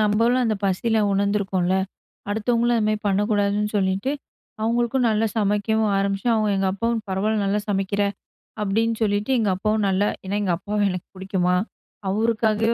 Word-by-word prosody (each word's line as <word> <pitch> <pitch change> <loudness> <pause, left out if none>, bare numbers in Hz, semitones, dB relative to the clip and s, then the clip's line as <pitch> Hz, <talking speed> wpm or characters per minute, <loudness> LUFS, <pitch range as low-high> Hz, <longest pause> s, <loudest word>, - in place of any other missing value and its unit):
நம்பளும் 230 +4 +3
அந்த 220 -2 +1
பசியில 220 +4 +1
உணர்ந்துருக்கோல. 195 -2 +1 0.6
அடுத்தவங்களும் 235 +2 +1
அந்த 210 - +1
மாரி 215 0 +1
பண்ணக்கூடாதுன்னு 205 +1 +1
சொல்லிட்டு 195 +6 0 0.5
அவங்களுக்கும் 240 +2 +1
நல்லா 220 0 +2
சமைக்கவும் 210 +1 +1
ஆரம்பிச்சேன். 195 +4 0
அவங்க 215 -1 +1
எங்க 195 0 +1
அப்பாவும் 230 +3 -1
"பரவால 195 +3 0
நல்லா 200 +1 +1
சமைக்கிற", 200 0 0 0.6
அப்டின்னு 225 +3 +1
சொல்லிட்டு 205 +4 0
எங்க 215 -3 +1
அப்பாவும் 215 +1 0
நல்லா 195 +2 +2 0.2
ஏனா 200 +2 -1
எங்க 180 -3 +1
அப்பாவ 205 +3 -3
எனக்கு 180 -1 -5
புடிக்குமா 185 -1 0 0.5
அவருக்காகவே 225 +1 +1
210 Hz, 140 wpm, -23 LUFS, 195-225 Hz, 0.6 s, நம்பளும்